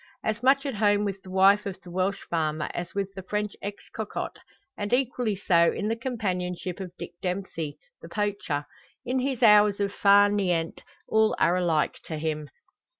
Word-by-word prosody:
As 220 +1 -1
much 270 +2 +4
at 275 - -2
home 205 -1 +2
with 195 -1 -3
the 190 - -13
wife 195 +2 +4
of 190 -1 -6
the 175 - -11
Welsh 190 +2 -1
farmer 155 -2 -1
as 175 +2 -5
with 195 -1 -2
the 190 - -7
French 210 +2 -3
ex 205 0 -7
cocotte, - - -4 0.4
and 205 0 -4
equally 245 -4 +1
so 170 -3 +3
in 210 - -2
the 225 - +1
companionship 185 -7 -3
of 185 -2 -6
Dick - - -7
Dempsey, 180 -5 -3 0.2
the - - -10
poacher. 200 -8 -2 0.4
In 255 +2 0
his 260 -1 -1
hours 210 -2 +6
of 200 -1 -1
far 200 0 +6
niente 180 -5 0 0.3
all 220 0 +3
are 170 +2 +3
alike 170 -4 +1
to 160 - -4
him. 155 -1 -3
200 Hz, 180 wpm, -27 LUFS, 180-210 Hz, 0.4 s, hours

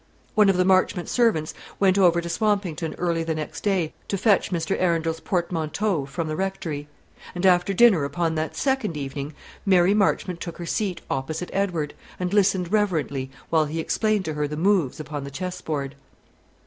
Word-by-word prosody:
One 210 -2 +5
of 190 - +3
the 180 - +3
Marchmont 185 -1 +2
servants 220 -11 +1 0.3
went 190 -2 +4
over 175 -3 +4
to 170 - -6
Swampington 180 -4 -1
early 170 -2 0
the 160 -1 -2
next 155 -1 -5
day 190 -6 0
to 200 - -1
fetch 205 +1 +3
Mr. 170 -3 -1
Arundel's 165 -2 +1
portmanteaus 170 -2 -1
from 165 +2 -3
the 155 - -2
Rectory; 165 -5 -3 0.5
and 175 +2 -1
after 180 +1 +4
dinner 195 -6 +5
upon 165 +3 -1
that 155 0 -2
second 265 - 0
evening, 140 +1 -5 0.3
Mary 185 -1 +4
Marchmont 185 -4 +1
took 170 - -6
her 175 - -6
seat 190 +1 -2
opposite 155 +6 -3
Edward, 175 -7 -1 0.3
and 180 +1 -2
listened 190 -3 +2
reverently 160 -11 0 0.2
while 160 -2 +4
he 155 +2 -4
explained 215 +4 0
to 155 - -2
her 150 0 -1
the 150 +1 -5
moves 175 -5 +2
upon 145 -1 -5
the 140 - -6
chessboard. 155 -4 -4
175 Hz, 175 wpm, -24 LUFS, 155-195 Hz, 0.5 s, One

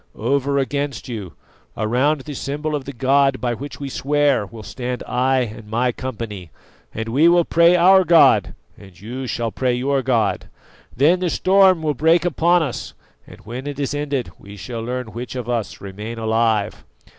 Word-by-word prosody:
Over 140 +4 0
against 140 0 -2
you, 105 -8 -6 0.4
around 130 +7 +1
the 145 +2 -8
symbol 150 +3 -4
of 145 -3 -3
the 140 - -6
god 135 +1 +2
by 120 -1 -1
which 140 +5 -8
we 140 - -5
swear, 140 -4 +1
will 110 +1 -11
stand 125 +4 -5
I 130 +1 +1
and 110 -2 -6
my 120 +3 +1
company, 115 -8 -6 0.4
and 115 +1 -5
we 145 +8 +4
will 175 -1 +4
pray 170 +1 +4
our 190 +2 +6
god 165 -2 +4 0.2
and 95 -4 -15
you 125 +6 -6
shall 115 -1 -2
pray 125 +1 0
your 135 +2 0
God. 120 -5 0 0.5
Then 160 +8 +4
the 180 -1 0
storm 185 -1 +4
will 150 -1 +1
break 160 +4 +3
upon 175 0 +2
us, 135 -6 -5 0.3
and - - -14
when 125 +6 -7
it 145 -1 -5
is 140 -1 -2
ended 145 -4 -3
we 100 +1 -12
shall 115 +6 -6
learn 125 0 -5
which 125 +2 -6
of 125 -2 -5
us 110 -10 -3
remain 105 +4 -7
alive. 110 -2 0
130 Hz, 180 wpm, -20 LUFS, 115-145 Hz, 0.5 s, our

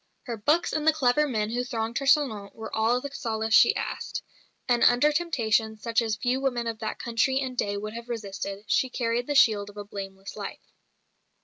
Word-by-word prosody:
Her 240 - -4
books 300 +11 +1
and 310 0 -1
the 315 - +6
clever 300 0 +2
men 215 -4 -1
who 245 +1 -1
thronged 230 -1 -2
her 275 - -4
salon 235 -9 +2
were 220 -1 -6
all 225 +3 +2
the 280 +2 -7
solace 220 -5 -2
she - - +7
asked; - - -4 0.4
and 240 -2 +2
under 250 +5 +5
temptation 225 -9 0
such 230 +2 0
as 220 -2 -1
few 245 +5 -1
women 245 -3 -1
of 225 -1 -4
that 220 - -4
country 260 +3 +1
and 260 -2 -3
day 205 -4 -1
would 215 +1 -5
have 235 +1 -8
resisted, 200 -3 -5
she 260 +4 +1
carried 240 -1 -1
the 290 - -1
shield 210 -6 +4
of 205 - -14
a 205 - -6
blameless 195 -1 -8
life. - - -8
230 Hz, 205 wpm, -27 LUFS, 215-260 Hz, 0.4 s, she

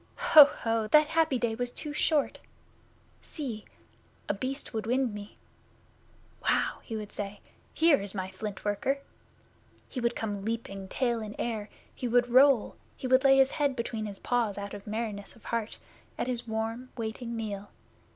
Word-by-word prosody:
Ho! 300 -2 +9
Ho! 225 -5 -1
That 300 +6 +6
happy 320 -4 +2
day 235 -2 0
was 245 +2 -3
too 295 +3 -4
short! 300 -1 +1 0.8
See! 245 -9 -6 0.6
A - - +1
Beast 260 +8 -4
would 220 -1 -3
wind 250 -1 +1
me. 205 0 -9 1.0
"Wow!" - - +1
he 225 - -6
would 210 -1 -5
say. 200 0 -5 0.3
"Here 320 -6 +4
is 200 0 -4
my 190 -1 -3
Flint 205 +1 -6
worker!" 205 +7 0 0.9
He 255 - -5
would 235 0 +1
come 205 -3 -3
leaping, 200 -3 -4
tail 235 +2 0
in 210 -1 -6
air; 220 -3 -3 0.2
he 250 - -4
would 245 +1 +3
roll; 260 -1 +5 0.2
he - - -7
would 260 +1 +4
lay 270 -1 +6
his 270 0 +5
head 285 -3 +1
between 230 -3 -3
his 200 -1 -7
paws 230 -4 0
out 200 0 -5
of 205 0 -9
merriness 215 -1 -4
of 230 - -20
heart 230 -2 -2 0.4
at - - -1
his 240 -2 -3
warm, 225 +3 -3
waiting 230 +1 -4
meal. 205 -3 -4
230 Hz, 170 wpm, -29 LUFS, 210-255 Hz, 1.0 s, Ho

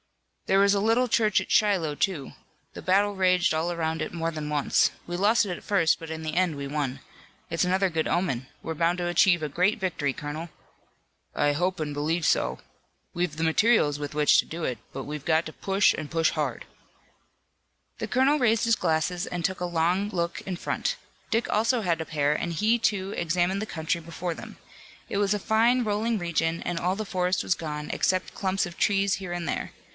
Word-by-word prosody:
"There 195 - +4
was 200 0 +5
a 200 - +1
little 230 +4 +3
church 220 -3 +3
at - - -6
Shiloh, 185 -8 +2
too. 155 -4 -2 0.4
The - - -8
battle 200 +2 +2
raged 185 -3 +3
all 160 +2 0
around 160 -2 -2
it 155 - -3
more 165 -1 -2
than 155 -2 -5
once. 145 -2 +2 0.2
We 175 - -3
lost 210 +5 +3
it 180 -3 -3
at - - -12
first, 170 -6 +2
but 165 - -8
in 160 0 -5
the 155 -1 -3
end 175 -4 +1
we 140 0 -4
won. 140 -2 -2 0.5
It's 165 - 0
another 190 +2 +2
good 160 -2 -1
omen. 135 -9 -1 0.2
We're 165 - -3
bound 170 +3 +1
to 175 -1 -2
achieve 175 0 +4
a - - 0
great 180 +9 +1
victory, 170 -7 -1
colonel." 150 +5 -6 0.9
"I 145 0 +2
hope 180 +4 -1
and 150 -2 -3
believe 160 +3 -1
so. - - +1 0.5
We've 175 -2 -1
the 160 +1 -3
materials 160 -3 +3
with 145 0 -5
which 150 0 +4
to - - +2
do 165 +1 -6
it. 125 - -3
But 135 - -5
we've 150 0 -6
got 160 0 +2
to 155 - -7
push 195 0 +2
and 155 -2 -6
push 165 -1 +2
hard." - - -3 1.3
The - - -3
colonel 265 +4 +3
raised 230 -3 +3
his 230 0 +4
glasses 170 0 0
and 175 -2 -3
took 190 -1 -2
a - - 0
long 175 +4 +1
look 170 -3 -2
in 185 -2 -5
front. - - -2 0.3
Dick 230 +2 +1
also 230 +3 +2
had 170 -5 0
a - - -4
pair 150 -2 +1
and 170 +3 -2
he, 215 +8 +2
too, 200 -4 0
examined 175 +3 0
the - - -2
country 165 -3 -2
before 170 +1 -4
them. - - -10 0.5
It - - -3
was 200 0 +2
a - - -2
fine, 230 +5 +3
rolling 215 +2 0
region 165 -2 -1
and 175 - -3
all 180 +2 0
the 215 - -3
forest 180 -1 0
was 180 - +1
gone, 150 -2 -5
except 185 0 0
clumps 190 0 0
of 175 0 -9
trees 200 -1 +2
here 185 -3 -4
and 175 -1 -3
there. - - -3
175 Hz, 210 wpm, -26 LUFS, 160-195 Hz, 1.3 s, was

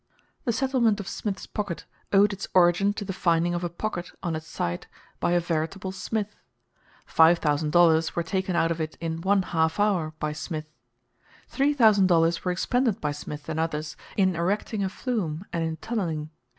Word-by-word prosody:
The 240 - +2
settlement 235 -3 +2
of 200 - -6
Smith's 200 -2 -4
Pocket 205 -6 -4 0.3
owed 200 +1 +5
its 195 - -5
origin 180 +3 +5
to 205 -1 -5
the 195 - -3
finding 170 -1 +2
of 175 0 -2
a 175 - -1
"pocket" 175 0 -4
on 170 -2 -1
its 155 0 -6
site 85 - -3 0.3
by 175 - +1
a 175 - +4
veritable 170 +3 -2
Smith. 210 +2 -3 0.7
Five 165 +2 +5
thousand 150 -1 0
dollars 165 -1 +4
were 170 - 0
taken 185 +2 -1
out 165 -1 +2
of 165 -1 -2
it 155 0 -4
in 165 -1 -3
one 195 +1 +3
half 160 -1 0
hour 180 -7 +1
by 155 0 -2
Smith. 155 0 -6 0.7
Three 285 +2 +1
thousand 215 -7 +5
dollars 165 -1 +3
were 180 - 0
expended 235 +5 +1
by 150 - -1
Smith 145 0 -7
and 155 - -2
others 155 -2 -2 0.2
in 190 -3 +3
erecting 200 +4 -1
a 190 - 0
flume 190 - -3
and 165 - 0
in 160 -1 -2
tunneling. 160 -7 -3
175 Hz, 185 wpm, -26 LUFS, 160-200 Hz, 0.7 s, owed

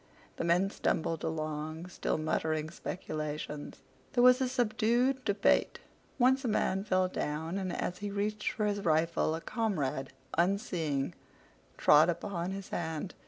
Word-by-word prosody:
The - - -2
men 175 +4 +2
stumbled 165 -4 -1
along 155 +1 -3
still 180 - -1
muttering 155 0 -1
speculations. 155 -4 -5 0.3
There 245 -2 +4
was 250 +1 +7
a 255 - +1
subdued 245 +2 +1
debate. 205 -2 +2 0.4
Once 260 +1 +4
a - - -1
man 195 -3 +1
fell 185 -3 +2
down, 160 +2 -3
and 185 -2 -2
as 180 +1 -3
he 205 0 -3
reached 210 +1 -1
for 215 - -1
his 205 -1 0
rifle 160 -1 +2
a 165 - -5
comrade, 150 - -2 0.2
unseeing, 170 -6 0 0.6
trod 150 +3 +6
upon 175 +1 -2
his 195 0 -6
hand. 160 +1 -3
180 Hz, 140 wpm, -31 LUFS, 155-210 Hz, 0.6 s, was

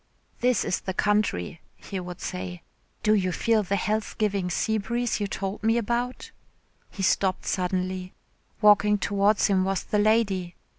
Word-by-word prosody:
"This 250 -3 +2
is - - 0
the 190 - -4
country," 200 - 0
he 195 - -6
would 180 0 -8
say. 180 -2 -5 0.4
"Do 215 - +4
you 185 -3 +1
feel 225 +3 +2
the 200 0 -1
health 215 +2 -1
giving 200 -4 0
sea 220 +6 0
breeze 235 +3 -1
you 205 - -1
told 195 +1 -4
me 225 +2 +2
about?" 240 +2 -2 0.6
He 195 - -6
stopped 190 0 +1
suddenly. 185 0 -2 0.5
Walking 210 0 +5
towards 200 +1 +2
him 190 -2 +3
was 195 0 -1
the 210 - 0
lady. 205 -5 +1
200 Hz, 155 wpm, -26 LUFS, 185-215 Hz, 0.6 s, Walking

